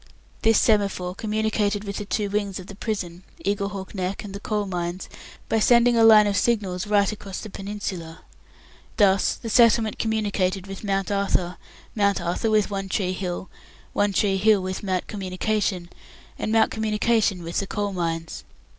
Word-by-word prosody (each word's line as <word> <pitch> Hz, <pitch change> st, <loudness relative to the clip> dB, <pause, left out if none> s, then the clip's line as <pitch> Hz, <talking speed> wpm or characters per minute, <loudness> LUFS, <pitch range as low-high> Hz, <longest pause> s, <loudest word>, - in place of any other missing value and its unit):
This 225 Hz, -1 st, +4 dB
semaphore 200 Hz, -4 st, +1 dB
communicated 210 Hz, 0 st, -1 dB
with 200 Hz, -1 st, -5 dB
the 210 Hz, -, -4 dB
two 205 Hz, +2 st, -1 dB
wings 200 Hz, -1 st, -2 dB
of 185 Hz, -, -9 dB
the 200 Hz, -, -10 dB
prison 190 Hz, -5 st, -4 dB, 0.2 s
Eaglehawk 200 Hz, -1 st, -2 dB
Neck 190 Hz, +1 st, -3 dB
and 200 Hz, -2 st, -8 dB
the 200 Hz, -, -6 dB
Coal 210 Hz, 0 st, -2 dB
Mines 175 Hz, -1 st, -4 dB, 0.4 s
by 225 Hz, -, +1 dB
sending 240 Hz, +2 st, +5 dB
a 230 Hz, -, +5 dB
line 215 Hz, -1 st, +8 dB
of 205 Hz, -1 st, 0 dB
signals 200 Hz, -3 st, 0 dB
right 205 Hz, -1 st, +3 dB
across 200 Hz, -2 st, -7 dB
the 215 Hz, -, -8 dB
peninsula. 195 Hz, -5 st, -6 dB, 0.8 s
Thus, 195 Hz, -1 st, +3 dB
the -, -, -9 dB
settlement 225 Hz, -1 st, +4 dB
communicated 200 Hz, -4 st, 0 dB
with 195 Hz, +1 st, -8 dB
Mount 195 Hz, -1 st, -1 dB
Arthur, 185 Hz, -3 st, 0 dB, 0.4 s
Mount 200 Hz, -2 st, +2 dB
Arthur 175 Hz, +6 st, -1 dB
with 215 Hz, -1 st, +2 dB
One 195 Hz, -1 st, -3 dB
tree 185 Hz, -1 st, 0 dB
Hill, 185 Hz, 0 st, -4 dB, 0.5 s
One 205 Hz, 0 st, +2 dB
tree 195 Hz, 0 st, +1 dB
Hill 205 Hz, 0 st, +4 dB
with 185 Hz, 0 st, -4 dB
Mount 185 Hz, -3 st, -1 dB
Communication, 195 Hz, -2 st, -2 dB, 0.5 s
and 215 Hz, -, -2 dB
Mount 225 Hz, 0 st, +4 dB
Communication 215 Hz, -3 st, +1 dB
with 170 Hz, +1 st, -2 dB
the 195 Hz, -, -3 dB
Coal 205 Hz, 0 st, -2 dB
Mines. 165 Hz, -2 st, -3 dB
200 Hz, 165 wpm, -24 LUFS, 185-215 Hz, 0.8 s, line